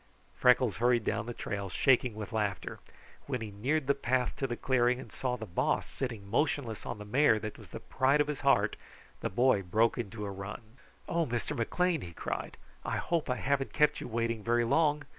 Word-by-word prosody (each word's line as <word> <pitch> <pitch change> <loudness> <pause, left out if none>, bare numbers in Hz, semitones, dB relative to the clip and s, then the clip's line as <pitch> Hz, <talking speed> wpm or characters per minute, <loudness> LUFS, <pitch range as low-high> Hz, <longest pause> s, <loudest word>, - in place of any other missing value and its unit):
Freckles 125 -4 +4
hurried 120 0 +3
down 110 +2 -1
the - - -3
trail, 100 -1 -4
shaking 125 +2 +3
with 110 +1 -6
laughter. 105 -6 -2 0.5
When 130 -3 -1
he 110 -2 -6
neared 135 +9 0
the 140 - +3
path 130 -2 0
to 135 - -1
the 120 - -4
clearing 125 -1 +2
and - - -10
saw 125 -1 -2
the 110 - -6
Boss 130 - 0
sitting 115 -7 -5
motionless 130 -1 -1
on 120 - -4
the 105 - -8
mare 120 +1 +4
that 110 0 -6
was - - -12
the - - -7
pride 135 +2 +2
of 150 - +4
his 150 -1 -4
heart, 105 -7 +3 0.4
the - - -2
boy 120 0 +3
broke 110 +7 +2
into 105 -2 -4
a 100 - -4
run. 95 +4 -6 0.5
"Oh, 170 -1 0
Mr. 120 -1 -2
McLean!" 170 +7 +1
he 85 -5 -8
cried. - - -4 0.3
"I - - -2
hope 165 -5 -1
I 125 - +1
haven't 135 +1 -1
kept 150 -1 +3
you - - -5
waiting 115 -1 -1
very 120 +1 +2
long! 150 +3 +2
120 Hz, 205 wpm, -31 LUFS, 110-135 Hz, 0.5 s, Freckles